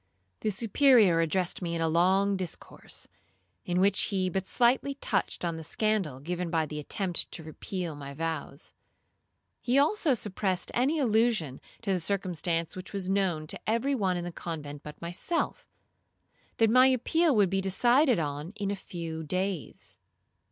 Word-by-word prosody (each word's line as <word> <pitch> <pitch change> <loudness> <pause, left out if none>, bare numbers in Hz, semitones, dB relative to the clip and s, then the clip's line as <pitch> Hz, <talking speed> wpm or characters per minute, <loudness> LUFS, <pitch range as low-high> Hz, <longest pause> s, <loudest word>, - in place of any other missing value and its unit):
The 215 - -1
Superior 220 -3 +4
addressed 175 +3 0
me 170 -1 -2
in - - -2
a 165 - +2
long 190 +5 +3
discourse, 185 -3 -6 0.6
in 180 0 0
which 195 +1 +4
he 185 -2 -1
but 190 +1 -2
slightly 255 +3 +2
touched 195 -8 -1
on 170 -1 -2
the 160 - -7
scandal 195 -7 -1
given 175 +4 -3
by 165 -2 +1
the 150 0 -6
attempt 180 +4 -1
to 165 - -5
repeal 165 +1 -5
my 140 -1 -8
vows. 165 +1 -4 0.9
He 250 +2 +1
also 300 0 +3
suppressed 190 -4 -1
any 270 +7 +2
allusion 220 - +1 0.2
to 200 - 0
the 185 - +1
circumstance 175 -3 -1
which 185 +1 -8
was 190 -1 -2
known 185 -6 0
to - - -3
every 235 +5 +1
one 190 -8 +1
in 175 - -3
the 175 - -5
convent 150 -4 -6
but 150 -1 -10
myself, 175 - -2 0.9
that 225 -1 +4
my 255 +2 +7
appeal 290 +4 +2
would 200 -4 +3
be 195 0 +1
decided 240 +8 +3
on 150 +3 -3
in 200 -2 -2
a - - -1
few 165 -4 -6
days. 185 +1 -3
185 Hz, 160 wpm, -29 LUFS, 165-220 Hz, 0.9 s, my